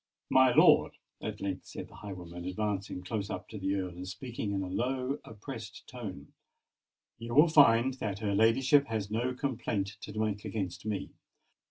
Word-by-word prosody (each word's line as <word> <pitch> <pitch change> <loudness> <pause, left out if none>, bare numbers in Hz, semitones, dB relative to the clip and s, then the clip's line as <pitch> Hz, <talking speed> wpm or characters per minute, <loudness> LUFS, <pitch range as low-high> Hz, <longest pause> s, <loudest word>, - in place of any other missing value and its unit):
"My 130 -1 +6
lord," 155 +4 +6 0.3
at - - -5
length 95 -2 -3
said - - -7
the - - -15
highwayman, 90 -4 -8
advancing 95 -1 -2
close 100 +1 -3
up - - -5
to 110 - -7
the 95 +1 0
Earl, 95 -2 -2
and 90 +1 -8
speaking 110 +1 -4
in 100 -1 -1
a - - -4
low, 130 +7 -1
oppressed 115 0 -9
tone, 100 - -8 0.9
"you 120 +1 -5
will 150 +4 +8
find 130 -5 +6
that 100 -3 -2
her 105 -1 -1
ladyship 130 +7 +4
has 105 -3 -3
no 125 +4 0
complaint 110 -7 -2
to 105 - -8
make 105 -2 -1
against 100 -2 -4
me. 105 -2 -3
110 Hz, 170 wpm, -31 LUFS, 95-125 Hz, 0.9 s, will